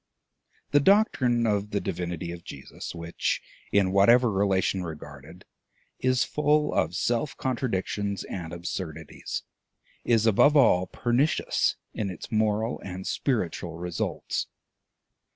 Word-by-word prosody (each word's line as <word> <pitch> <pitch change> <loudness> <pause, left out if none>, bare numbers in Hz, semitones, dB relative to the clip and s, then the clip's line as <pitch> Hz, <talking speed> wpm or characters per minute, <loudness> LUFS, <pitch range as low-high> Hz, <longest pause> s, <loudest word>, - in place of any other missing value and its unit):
The 145 - +6
doctrine 140 - +3
of 105 -1 0
the 100 - 0
divinity 85 -2 -4
of 85 -1 -8
Jesus, - - -8
which, 85 0 -2 0.3
in 100 -2 +3
whatever 115 +5 +5
relation 95 -1 +1
regarded, 75 +1 -9 0.5
is 130 -1 +2
full 150 0 +1
of 80 +3 0
self 120 +8 -1
contradictions 100 -5 -2
and 85 -4 -6
absurdities, 85 -2 -5 0.6
is, 115 -2 +3
above 140 +7 +5
all, 95 -9 +5
pernicious 125 +6 +1 0.2
in 105 -2 -2
its 90 - -8
moral 110 +1 +1
and 95 0 -6
spiritual 90 - -2
results. 90 0 -3
100 Hz, 115 wpm, -27 LUFS, 90-120 Hz, 0.6 s, The